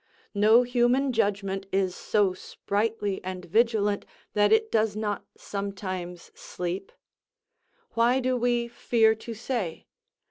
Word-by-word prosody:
No 215 +4 +5
human 250 +2 +2
judgment 195 -3 -1
is 190 -2 0
so 205 -3 +1
sprightly 205 +1 -2
and 185 -1 -5
vigilant 210 +1 +2 0.3
that 205 0 +3
it 440 0 +3
does 215 -2 +2
not 210 -1 -3
sometimes 185 -3 -5
sleep. 180 +2 -5 1.0
Why 240 +3 +3
do 255 0 0
we 240 -1 +1
fear 230 -1 +3
to 225 +1 -8
say? 220 -7 -3
210 Hz, 115 wpm, -27 LUFS, 195-235 Hz, 1.0 s, No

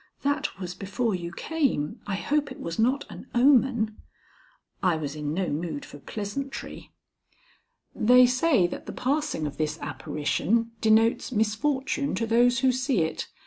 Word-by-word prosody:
"That 285 - -1
was 180 -2 -5
before 205 +5 -2
you 175 -2 -4
came. 270 - -1
I 200 - -1
hope 290 +6 0
it - - -9
was 165 +3 -5
not 255 +5 +2
an - - -10
omen." 240 -4 +3 0.8
I 180 -3 +3
was 150 -2 -4
in 150 -1 -3
no 180 +3 -1
mood 155 -1 -3
for 145 - -12
pleasantry. 220 - -6 1.0
"They 250 +3 +6
say 255 - +3
that 175 - -5
the - - -5
passing 280 - -1
of 145 -1 -5
this 155 -1 -1
apparition 155 - -1
denotes 225 +3 +3
misfortune 260 +5 0
to 230 +4 -1
those 240 +2 +3
who 260 -1 +4
see 255 - 0
it. 160 - -3
225 Hz, 150 wpm, -26 LUFS, 175-260 Hz, 1.0 s, They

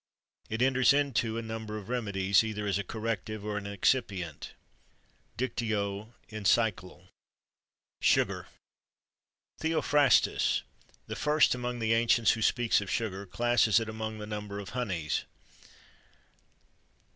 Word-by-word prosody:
It 110 +3 0
enters 130 0 +4
into 130 -6 0
a 115 - -3
number 110 -1 -5
of 100 -2 -9
remedies, 100 -5 +2
either 105 -1 -4
as 100 -1 0
a - - -2
corrective, 110 0 -4
or 105 -1 -2
an 100 - -10
excipient." 100 - -1 0.8
"Dictio. 110 -3 -2 0.2
Encycl." 100 -4 0 0.9
SUGAR. - - +2 1.1
Theophrastus, 150 -3 +3 0.4
the - - -6
first 150 +1 +3
among 125 0 -3
the 115 -1 +1
ancients 115 0 +4
who 115 - -2
speaks 120 -1 +2
of 100 - -6
sugar, 100 -3 -2
classes 120 +1 +3
it 115 - -4
among 110 0 -5
the 105 - -6
number 105 -1 -5
of 100 -2 -6
honeys. 95 -11 -2
110 Hz, 120 wpm, -30 LUFS, 100-120 Hz, 1.1 s, enters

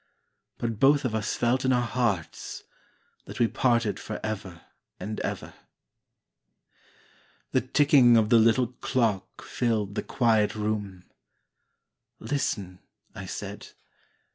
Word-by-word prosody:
But 115 -3 -3
both 140 +2 +4
of 120 - -1
us 110 -1 -1
felt 120 +2 +1
in 130 - +2
our 125 -1 +2
hearts 115 -9 -2 0.6
That - - -9
we 120 - +4
parted 115 -3 +1
for 110 - -6
ever 95 -5 -5 0.4
and 105 +4 -5
ever. - - -4 2.0
The - - +2
ticking 130 -2 +5
of 110 -1 +2
the 115 -1 +6
little 115 +2 +3
clock 115 -7 -1
filled 110 -5 -1
the - - -2
quiet 110 -5 +1
room. 105 -3 -3 1.2
"Listen," 100 -10 -3 0.3
I - - -8
said. - - -7
115 Hz, 115 wpm, -27 LUFS, 105-125 Hz, 2.0 s, the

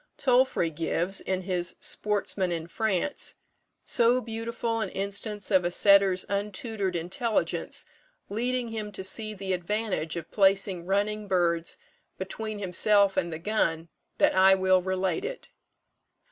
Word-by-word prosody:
Tolfrey 250 -10 +2
gives, 170 +4 -2
in 190 -1 -2
his 180 -1 -1
"Sportsman 200 -3 -2
in 165 -1 -3
France," 220 - -2 0.5
so 240 +2 +4
beautiful 230 0 -3
an 205 - -2
instance 200 +2 -4
of 190 -2 +4
a 175 - +1
setter's 195 0 +4
untutored 200 -1 -3
intelligence 190 +7 -2 0.4
leading 245 +3 -1
him 215 -2 -5
to 190 - -6
see 215 +3 +1
the 190 -1 -3
advantage 185 -3 -2
of 170 -2 -7
placing 195 -3 +2
running 205 +2 -1
birds 170 -3 0 0.4
between 215 +3 -5
himself 200 +1 +4
and 170 -2 -1
the 160 - -4
gun, 165 -3 -1 0.3
that - - +3
I 190 +1 +6
will 185 -1 +3
relate 190 - -1
it. - - -6
195 Hz, 130 wpm, -27 LUFS, 180-215 Hz, 0.5 s, I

